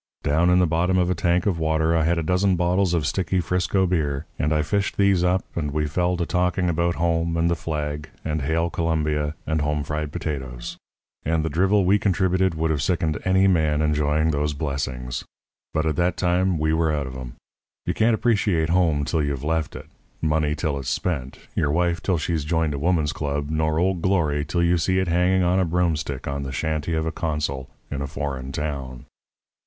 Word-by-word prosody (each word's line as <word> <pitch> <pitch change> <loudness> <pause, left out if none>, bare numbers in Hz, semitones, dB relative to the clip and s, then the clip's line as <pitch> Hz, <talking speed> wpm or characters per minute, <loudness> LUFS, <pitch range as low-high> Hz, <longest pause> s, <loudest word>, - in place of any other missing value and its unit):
Down 80 +5 +3
in 90 - +5
the 90 - +4
bottom 85 +3 +1
of 90 0 +2
a - - +3
tank 85 +1 +1
of 95 -5 0
water 80 +1 +1
I 80 -1 +2
had 85 +1 +2
a 85 - 0
dozen 90 +3 +2
bottles 90 +1 +2
of 80 -3 0
sticky 95 +3 0
Frisco 90 +2 +1
beer; 75 -6 -1
and 75 - +1
I 75 0 +2
fished 100 +5 -1
these 100 -3 +3
up, 90 +1 +1
and 75 -3 -1
we 75 +1 -1
fell 90 +4 0
to 85 - -1
talking 90 0 +1
about 85 +1 +1
home 85 0 0
and 85 +1 +2
the - - +2
flag 75 -2 -4 0.2
and 80 -1 -1
Hail 80 +4 0
Columbia 75 -2 0
and 80 -1 0
home 75 0 0
fried 75 0 -3
potatoes; 65 -7 -5 0.5
and 80 0 0
the 80 - -2
drivel 95 +5 +3
we 100 +3 +4
contributed 95 -2 +1
would 80 0 0
have 75 -3 0
sickened 80 0 0
any 95 +1 +4
man 80 -4 +2
enjoying 75 +1 +2
those 75 0 0
blessings. 65 -4 -3 0.5
But 80 0 0
at 80 - 0
that 90 +1 +1
time 90 0 +1
we 80 +1 +1
were 80 -1 +2
out 75 -2 -1
of 65 0 -7
'em. 65 -2 -8 0.5
You - - 0
can't 110 +1 +3
appreciate 100 -8 +1
home 85 -5 +2
till 80 - 0
you've 70 -2 -2
left 80 0 -1
it, - - -8 0.3
money 75 -1 +1
till 75 -2 -2
it's 65 -3 -4
spent, 70 -8 -2 0.2
your 75 - +1
wife 85 +2 +1
till 95 -3 +1
she's 80 -1 -1
joined 80 0 0
a 70 - -3
woman's 80 -1 +1
club, 75 0 -3
nor 80 0 +1
Old 90 +1 +1
Glory 80 -6 +1
till 85 +3 0
you 85 0 +3
see 95 +3 +1
it 95 0 +1
hanging 90 +2 +3
on 90 +2 +2
a - - +3
broomstick 80 -5 -1
on 70 0 -2
the 70 -1 -5
shanty 80 +3 -2
of 80 0 -1
a 80 - -1
consul 75 -6 -3 0.2
in 70 -1 -3
a 70 - -2
foreign 70 -2 -4
town. 70 -4 -4
80 Hz, 210 wpm, -23 LUFS, 75-90 Hz, 0.5 s, in